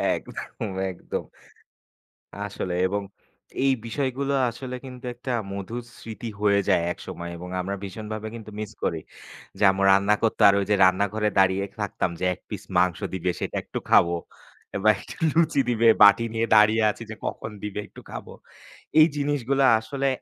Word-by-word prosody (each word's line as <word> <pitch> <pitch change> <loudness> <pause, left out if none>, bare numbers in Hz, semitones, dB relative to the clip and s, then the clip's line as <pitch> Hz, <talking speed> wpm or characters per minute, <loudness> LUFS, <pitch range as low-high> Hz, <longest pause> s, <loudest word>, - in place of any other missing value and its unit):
একদম, 105 - -6 0.2
একদম। 90 - -5 1.2
আসলে 95 -3 -4
এবং 100 +1 -2 0.6
এই 135 - +4
বিষয়গুলো 135 +2 -2 0.2
আসলে 125 +2 -7
কিন্তু 125 -1 -10
একটা 125 +2 -7 0.2
মধুর 105 +5 -5 0.2
স্মৃতি 115 +1 -7
হয়ে 100 -1 +4
যায় 85 - +4
একসময় 85 0 -8
এবং 90 +1 -8
আমরা 100 +2 -3
ভীষণভাবে 110 +2 -6
কিন্তু 110 -2 -9
মিস 105 -1 -5
করি। 80 - 0 0.6
যে - - -4
আম্মু 95 0 -1
রান্না 100 +2 +4
করতো 115 - 0
আর 100 - +5
ওই - - 0
যে - - +5
রান্নাঘরে 100 +3 +2
দাঁড়িয়ে 95 +1 +3 0.2
থাকতাম - - -1
যে - - -1
১ - - -22
পিস - - -5 0.2
মাংস 90 -3 +2 0.2
দিবে 90 -1 0
সেটা - - -3
একটু - - -5
খাবো। 85 0 +5 0.7
বা 110 - +7
একটু - - -10 0.2
লুচি 160 -3 +3
দিবে 115 0 +3
বাটি 105 +3 +7
নিয়ে 115 +1 +1
দাঁড়িয়ে 110 +1 +5
আছি, 115 - -7
যে 110 - -5
কখন 110 - -4
দিবে 105 -1 -4
একটু - - -13
খাবো। - - -8 0.7
এই 155 - +8
জিনিসগুলা 140 -2 +1
আসলে 135 +5 -2
110 Hz, 160 wpm, -25 LUFS, 100-120 Hz, 1.2 s, এই